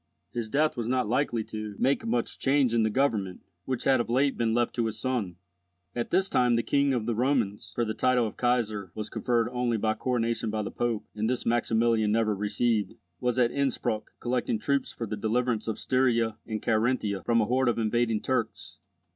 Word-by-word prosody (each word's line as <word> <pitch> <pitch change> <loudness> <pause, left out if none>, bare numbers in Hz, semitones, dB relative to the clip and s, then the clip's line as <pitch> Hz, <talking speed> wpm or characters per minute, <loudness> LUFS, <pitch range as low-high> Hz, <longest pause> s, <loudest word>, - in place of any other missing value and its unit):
His 115 -2 -3
death 150 +5 +2
was 120 -3 -3
not 125 -2 +1
likely 120 -1 0
to 110 -1 -6
make 135 +2 +1
much 115 +1 -2
change 135 -3 +2
in 115 - +3
the 110 - +2
government, 105 -7 0 0.2
which 130 -2 -2
had 135 -2 +4
of - - -6
late 135 +3 +2
been 115 -1 0
left 120 -1 +1
to 115 -2 0
his 110 - -5
son. 120 -9 -2 0.6
At 120 -1 -2
this 190 +2 +2
time 125 -7 +3
the 115 - +1
King 140 0 +2
of 120 -4 0
the 120 - 0
Romans 120 -4 0
(for 120 - +1
the 110 - -2
title 125 0 +2
of 110 - -5
Kaisar 110 -6 0
was 110 0 -5
conferred 120 -2 +1
only 125 -2 0
by 110 0 +1
coronation 115 -1 -1
by 105 0 -2
the - - -5
Pope, 120 -3 -2
and 110 +1 -1
this 125 0 -2
Maximilian 115 -2 +2
never 110 -1 +2
received) 105 0 0 0.2
was 125 0 0
at 120 -2 +3
Innspruck 130 -6 -1
collecting 120 -2 -1
troops 140 +5 -1
for 115 - -5
the 105 0 -4
deliverance 115 +1 0
of 110 - -2
Styria 115 -4 +1
and 110 -2 -4
Carinthia 110 -3 +1
from 115 -1 +2
a 110 - +3
horde 125 +3 +2
of 120 - 0
invading 115 0 +1
Turks. - - -3
115 Hz, 205 wpm, -28 LUFS, 110-125 Hz, 0.6 s, had